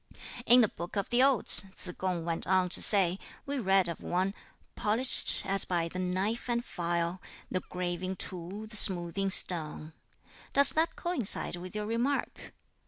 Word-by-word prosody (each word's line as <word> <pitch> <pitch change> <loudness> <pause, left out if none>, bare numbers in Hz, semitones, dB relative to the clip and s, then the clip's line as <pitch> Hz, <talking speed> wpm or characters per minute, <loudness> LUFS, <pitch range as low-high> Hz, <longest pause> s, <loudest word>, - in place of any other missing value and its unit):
"In 245 +1 +5
the 225 - +2
'Book 175 -1 -11
of 200 +2 -5
the 240 +1 +1
Odes,'" 265 -7 +2
Tsz 185 - -4
kung 180 -3 -5
went 165 -1 -4
on 185 0 0
to - - +5
say, 190 -3 +1 0.3
"we 280 0 -5
read 195 -4 0
of 170 - -8
one 185 +2 -3 0.4
Polished, 230 +5 +4
as 195 0 +3
by 170 -2 -3
the 185 - -9
knife 190 +7 -4
and 240 0 -3
file, 170 +1 -5 0.3
The 185 - -3
graving 180 +1 -6
tool, 185 +4 -8
the 215 0 -10
smoothing 190 -1 +4
stone. 160 -4 +1 0.6
Does 280 0 +6
that 320 +1 -2
coincide 260 - +4
with 180 +3 -11
your 210 0 -5
remark?" 240 +6 -5
190 Hz, 165 wpm, -27 LUFS, 175-220 Hz, 0.6 s, Does